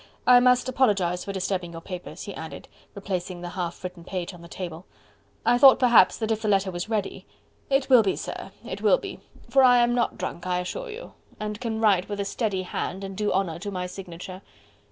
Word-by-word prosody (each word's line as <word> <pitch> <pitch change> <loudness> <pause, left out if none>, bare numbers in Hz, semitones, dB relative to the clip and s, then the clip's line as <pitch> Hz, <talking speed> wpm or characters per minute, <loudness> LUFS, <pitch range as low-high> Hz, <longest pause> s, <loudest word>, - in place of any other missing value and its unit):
I 250 0 +8
must 250 +1 +4
apologize 200 -9 +1
for 200 - -5
disturbing 185 -2 -2
your 165 - -6
papers," 180 0 -7
he 200 - -6
added, 160 -2 -8 0.3
replacing 185 -3 -4
the 175 - -5
half 175 -1 -5
written 180 -2 -7
page 180 0 -4
on 175 - -12
the 170 - -11
table, 170 -1 -7 0.6
"I 245 - +4
thought 270 0 +9
perhaps 240 -7 +5
that 225 -1 -2
if 220 0 0
the 215 - -2
letter 195 -2 +2
was 175 +3 -5
ready 215 -3 -3 0.2
..." - - -37
"It 270 0 +2
will 250 -3 +7
be, 195 -3 0
sir... - - -6 0.2
it - - -6
will - - +5
be... - - -8 0.3
for 270 -1 +4
I 250 -1 +7
am 240 0 +3
not 240 -1 0
drunk, 175 +2 -5
I 180 0 +1
assure 325 - -4
you.... 455 +3 -9 0.3
and 210 0 -4
can 225 -2 -2
write 200 -4 +3
with 205 -1 -4
a 200 - -1
steady 195 -2 -1
hand... 185 +1 -4
and 195 0 -6
do 210 +1 0
honour 180 -4 -1
to 205 +3 -5
my 180 -2 -3
signature...." 180 0 -8
195 Hz, 220 wpm, -25 LUFS, 180-230 Hz, 0.6 s, thought